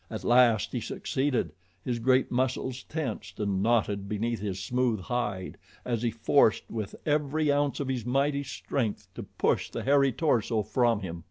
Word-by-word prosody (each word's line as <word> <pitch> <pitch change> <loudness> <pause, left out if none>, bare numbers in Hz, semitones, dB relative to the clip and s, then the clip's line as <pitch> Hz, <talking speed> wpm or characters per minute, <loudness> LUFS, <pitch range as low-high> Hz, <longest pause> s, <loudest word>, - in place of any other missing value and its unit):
At - - -6
last 120 -4 +4
he - - -2
succeeded 130 - -1 0.3
his 120 -2 -1
great 130 +2 +2
muscles 130 0 -1
tensed 115 - -5
and 100 -2 0
knotted 105 -3 +1
beneath 115 +2 -1
his 100 -2 -3
smooth 120 +2 0
hide 105 -5 -3 0.3
as 120 -3 -1
he 120 - +1
forced 115 +1 +3
with 110 -3 -4
every 150 0 +1
ounce 145 -1 +1
of 140 - -2
his 130 -3 -2
mighty 140 +4 +1
strength 130 -4 -3
to - - -7
push - - -1
the - - -5
hairy 140 0 +4
torso 115 -7 +1
from 115 +1 +1
him. 85 -3 -5
120 Hz, 165 wpm, -28 LUFS, 105-135 Hz, 0.3 s, last